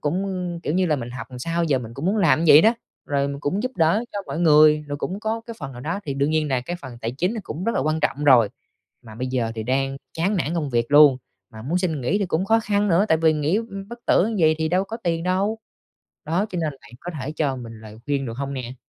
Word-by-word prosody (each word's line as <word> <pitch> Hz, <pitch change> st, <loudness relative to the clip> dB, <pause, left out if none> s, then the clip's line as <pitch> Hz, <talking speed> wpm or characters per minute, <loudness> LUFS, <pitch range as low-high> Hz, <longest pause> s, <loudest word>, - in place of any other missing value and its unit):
cũng, 175 Hz, +7 st, -1 dB, 0.4 s
kiểu 150 Hz, -, -2 dB
như 185 Hz, 0 st, +2 dB
là, 155 Hz, -3 st, +1 dB
mình 120 Hz, -2 st, -6 dB
học 120 Hz, -2 st, -7 dB
làm 125 Hz, -, -8 dB
sao 165 Hz, +5 st, -1 dB
giờ 140 Hz, -5 st, +1 dB
mình 115 Hz, -1 st, -8 dB
cũng 145 Hz, +6 st, -4 dB
muốn 205 Hz, +3 st, +1 dB
làm 160 Hz, -5 st, +3 dB
như 155 Hz, -, +7 dB
vậy 150 Hz, -, +10 dB
đó. 225 Hz, +2 st, +5 dB, 0.3 s
Rồi 140 Hz, -1 st, 0 dB
mình 140 Hz, 0 st, -5 dB
cũng 190 Hz, +10 st, -1 dB
giúp 255 Hz, +1 st, -3 dB
đỡ 170 Hz, +8 st, +2 dB
cho 205 Hz, -, -3 dB
mọi 160 Hz, -, -4 dB
người, 150 Hz, -2 st, +5 dB
rồi 145 Hz, -, -3 dB
cũng 190 Hz, +7 st, -4 dB
có 220 Hz, +1 st, -2 dB
cái 230 Hz, -, -7 dB
phần 135 Hz, -4 st, -6 dB
nào 120 Hz, -, -9 dB
đó 165 Hz, +9 st, -3 dB
thì 140 Hz, -, -3 dB
đương 140 Hz, +2 st, 0 dB
nhiên 155 Hz, -1 st, +1 dB
là 130 Hz, -2 st, 0 dB
cái 175 Hz, +8 st, -5 dB
phần 130 Hz, -7 st, -10 dB
tài 115 Hz, 0 st, -2 dB
chính 180 Hz, -, -1 dB
nó 220 Hz, -, -4 dB
cũng 175 Hz, +2 st, -6 dB
rất 230 Hz, -, 0 dB
là -, -, +1 dB
quan 155 Hz, +3 st, 0 dB
trọng 145 Hz, 0 st, -1 dB
rồi. 120 Hz, -7 st, +6 dB, 0.5 s
Mà 110 Hz, -3 st, -12 dB
bây 125 Hz, +4 st, -4 dB
giờ 125 Hz, -3 st, -1 dB
thì 110 Hz, -, -4 dB
đang 135 Hz, +3 st, -1 dB, 0.2 s
chán 190 Hz, +6 st, 0 dB
nản 165 Hz, -1 st, -1 dB
công 150 Hz, -5 st, -2 dB
việc 120 Hz, +1 st, 0 dB
luôn, 145 Hz, -3 st, +8 dB, 0.3 s
mà 110 Hz, 0 st, -10 dB
muốn 165 Hz, +8 st, -1 dB
xin 165 Hz, -6 st, -1 dB
nghỉ 130 Hz, +12 st, 0 dB
thì 200 Hz, -, -1 dB
cũng 170 Hz, +2 st, 0 dB
khó 225 Hz, +3 st, +3 dB
khăn 205 Hz, -1 st, 0 dB
nữa 180 Hz, +4 st, +4 dB
tại 160 Hz, -, +4 dB
vì 160 Hz, -1 st, +4 dB
nghỉ, 155 Hz, +5 st, 0 dB
ưm, 200 Hz, -3 st, -5 dB
bất 235 Hz, 0 st, -8 dB
tử 190 Hz, -, +4 dB
như 225 Hz, -, -2 dB
vầy 155 Hz, 0 st, +5 dB
thì 160 Hz, 0 st, 0 dB
đâu 185 Hz, +3 st, +1 dB
có 225 Hz, +3 st, -6 dB
tiền 170 Hz, -7 st, -2 dB
đâu, 195 Hz, +5 st, 0 dB, 0.7 s
đó, 175 Hz, +7 st, 0 dB
cho 180 Hz, -, -5 dB
nên 155 Hz, -3 st, -1 dB
bạn 105 Hz, -, -16 dB
có 175 Hz, -, -6 dB
thể 140 Hz, +4 st, -4 dB
cho 145 Hz, -4 st, -1 dB
mình 115 Hz, -3 st, -9 dB
lời 110 Hz, 0 st, -12 dB
khuyên, 140 Hz, -2 st, -1 dB
được 115 Hz, -, -6 dB
hông 140 Hz, 0 st, -3 dB
nè? 125 Hz, -1 st, -6 dB
155 Hz, 290 wpm, -23 LUFS, 135-185 Hz, 0.7 s, vậy